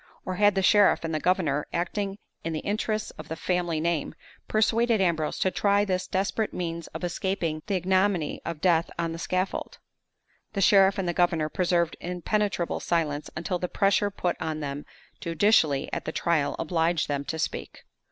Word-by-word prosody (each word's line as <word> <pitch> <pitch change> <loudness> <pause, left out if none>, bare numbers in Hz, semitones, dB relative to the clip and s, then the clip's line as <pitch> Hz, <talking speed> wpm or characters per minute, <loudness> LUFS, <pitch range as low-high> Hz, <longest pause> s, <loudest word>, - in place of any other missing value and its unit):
or 185 -1 -3
had 205 -1 +4
the 195 - +1
sheriff 205 -1 +5
and 165 -1 -3
the 155 - 0
governor, 160 -5 +1
acting 195 +3 -2 0.3
in 165 - -2
the 155 - -2
interests 215 +1 -1
of - - -8
the 160 - -4
family 175 -2 -1
name, 165 -2 -1 0.3
persuaded 225 +1 +2
Ambrose 165 -5 +1
to 185 - +1
try 200 +1 +2
this 185 -2 -1
desperate 200 +3 -1
means 170 -2 -4
of 160 - -8
escaping 175 -3 -2
the 200 - 0
ignominy 185 -2 +1
of 170 -2 -5
death 170 -2 +3
on 165 -1 -1
the 165 - -6
scaffold? 185 +3 -2 0.8
The - - -2
sheriff 195 0 +5
and 190 -2 -1
the 175 - 0
governor 170 -3 +2
preserved 170 -1 +1
impenetrable 180 +1 -1
silence 155 -4 -1
until 170 +3 -2
the 180 - -2
pressure 200 +1 +2
put 180 -3 -2
on 155 -1 -2
them 145 -1 -5 0.3
judicially 165 -5 +2
at - - -3
the - - -2
trial 160 -3 0
obliged 165 0 0
them 140 -1 -1
to 160 - -3
speak. 160 - -4
175 Hz, 175 wpm, -27 LUFS, 160-195 Hz, 0.8 s, sheriff